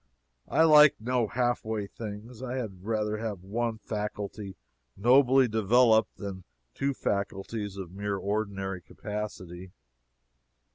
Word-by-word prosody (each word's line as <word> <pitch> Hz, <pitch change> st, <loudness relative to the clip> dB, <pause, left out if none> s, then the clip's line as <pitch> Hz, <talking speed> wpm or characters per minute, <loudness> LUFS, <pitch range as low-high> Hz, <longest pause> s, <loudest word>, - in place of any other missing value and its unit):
I 160 Hz, -, +3 dB
like 150 Hz, -2 st, +8 dB
no 120 Hz, 0 st, 0 dB
half 120 Hz, +1 st, 0 dB
way 110 Hz, -2 st, -2 dB
things. 110 Hz, +3 st, -8 dB
I 130 Hz, -1 st, -4 dB
had 100 Hz, -8 st, -5 dB
rather 105 Hz, 0 st, -1 dB
have 105 Hz, -5 st, -4 dB
one 115 Hz, +3 st, -2 dB
faculty 105 Hz, -2 st, -5 dB, 0.4 s
nobly 130 Hz, +4 st, +5 dB
developed 110 Hz, +1 st, +3 dB
than 95 Hz, -3 st, -6 dB, 0.3 s
two 140 Hz, 0 st, -1 dB
faculties 100 Hz, 0 st, -3 dB
of 95 Hz, -3 st, -7 dB
mere 100 Hz, +1 st, -3 dB
ordinary 100 Hz, -2 st, -2 dB
capacity. 95 Hz, -2 st, -7 dB
105 Hz, 115 wpm, -28 LUFS, 100-120 Hz, 0.4 s, like